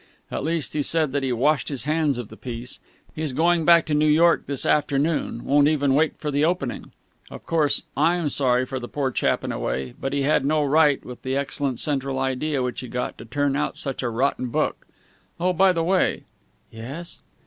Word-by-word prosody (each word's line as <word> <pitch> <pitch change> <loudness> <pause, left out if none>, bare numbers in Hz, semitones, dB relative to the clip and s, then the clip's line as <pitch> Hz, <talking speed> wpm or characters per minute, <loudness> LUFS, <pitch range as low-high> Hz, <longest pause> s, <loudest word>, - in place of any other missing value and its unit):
At - - -3
least, 160 0 -2
he 150 - 0
said 155 0 +2
that 145 +1 -1
he 135 -1 -1
washed 135 +3 +1
his 135 -5 -3
hands 150 -2 +1
of 120 -4 -6
the 110 - -11
piece. 120 +1 -6 0.3
He's 155 -3 -3
going 165 +3 +2
back 170 0 +6
to 155 - -2
New 150 +1 +3
York 165 +3 +4
this 140 -2 -2
afternoon 145 -4 0
won't 145 +1 +4
even 145 -3 +2
wait 155 +2 +2
for 150 - -3
the 145 +1 +1
opening. 160 -7 -2 0.4
Of - - -11
course, 155 -4 +2
I'm 160 +1 +1
sorry 130 -2 +2
for 130 0 -4
the 120 - -7
poor 135 -1 -2
chap - - 0
in - - -3
a - - -4
way, 65 +1 -3
but 135 - -2
he 140 0 0
had 145 0 +2
no 150 +2 +2
right, 145 0 +3
with 125 -1 -9
the 130 0 -2
excellent 140 -2 -2
central 135 -2 0
idea 135 +1 -1
which 125 -1 -3
he 130 - -6
got, 125 +1 -3
to 115 - -9
turn 140 +3 0
out 150 - -2
such 135 -3 -3
a 125 - -1
rotten 125 +2 0
book. 120 - -2 0.5
Oh, 180 +1 +1
by 190 +2 +4
the 165 -2 -1
way!" 185 +2 +1 0.5
"Yes?" 135 +10 -6
145 Hz, 215 wpm, -23 LUFS, 130-155 Hz, 0.5 s, back